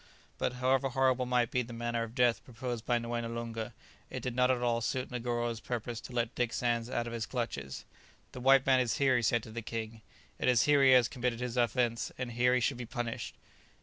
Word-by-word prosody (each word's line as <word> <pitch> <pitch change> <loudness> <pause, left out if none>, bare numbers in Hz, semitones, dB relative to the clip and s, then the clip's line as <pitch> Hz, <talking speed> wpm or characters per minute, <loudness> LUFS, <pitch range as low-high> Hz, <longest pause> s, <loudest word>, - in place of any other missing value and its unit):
But - - 0
however 130 +1 +1
horrible 130 -1 +2
might 125 -2 +2
be 125 - +2
the 120 -1 -7
manner 120 0 -2
of 115 +1 -5
death 120 -2 +3
proposed 120 -1 -5
by 120 - +3
Moené 115 0 -3
Loonga, 115 -1 -4 0.4
it - - -5
did 125 -2 -3
not 125 0 +3
at 125 -1 +1
all 120 -1 +1
suit 130 +3 -2
Negoro's 120 -1 -2
purpose 120 -1 -4
to - - -10
let 120 -1 -1
Dick 125 -1 -1
Sands 120 -1 0
out 120 - -1
of 120 - -6
his 115 -1 -3
clutches. 105 - -4 0.5
"The 125 - -8
white 135 +1 +5
man 130 -1 +5
is 125 -3 +1
here," 135 -2 +3
he 120 - +2
said 115 0 +2
to 110 - -10
the 115 +1 -5
king; 110 0 -5 0.4
"it - - 0
is 125 -2 +5
here 145 -1 +4
he 135 - +7
has 125 -2 +6
committed 125 -2 -2
his 125 -1 -3
offence, 120 -1 +1
and 125 -1 -4
here 125 +2 +3
he 125 - +2
should 130 +2 +1
be 120 - -5
punished." 120 -1 -4
120 Hz, 230 wpm, -31 LUFS, 115-125 Hz, 0.5 s, he